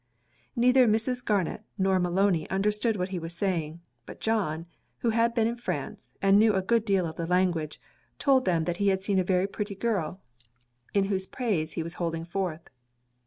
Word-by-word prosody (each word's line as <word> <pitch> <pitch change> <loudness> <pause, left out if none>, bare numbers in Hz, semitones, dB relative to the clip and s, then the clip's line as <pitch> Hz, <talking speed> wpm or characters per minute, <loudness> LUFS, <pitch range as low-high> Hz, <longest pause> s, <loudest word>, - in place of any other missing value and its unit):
Neither 250 +1 +5
Mrs. 230 +3 +1
Garnet 205 -1 0 0.2
nor 190 -1 +2
Maloney 180 -1 +1
understood 210 +3 +1
what 180 -1 -2
he 185 -2 -3
was 165 +1 -7
saying; 170 -4 -2 0.3
but - - -10
John, 180 -8 -1 0.4
who 235 - +2
had 230 +1 +2
been 225 -2 +3
in 235 +1 -1
France, 240 - -5
and 195 +1 +6
knew 215 -1 +4
a 190 - +2
good 230 +2 +2
deal 195 -4 +2
of 160 -1 -6
the 165 - -3
language, 175 -4 0 0.4
told 265 -2 +3
them 170 -3 +2
that 175 +1 -2
he 200 - +1
had 190 -1 +2
seen 195 -1 +1
a - - +2
very 180 0 +2
pretty 200 0 -4
girl, 195 -5 -1 0.8
in 200 - +4
whose 190 -1 -1
praise 190 -11 -2
he 165 - -2
was 165 +1 -6
holding 165 -1 -2
forth. 170 -2 -3
190 Hz, 190 wpm, -27 LUFS, 170-220 Hz, 0.8 s, and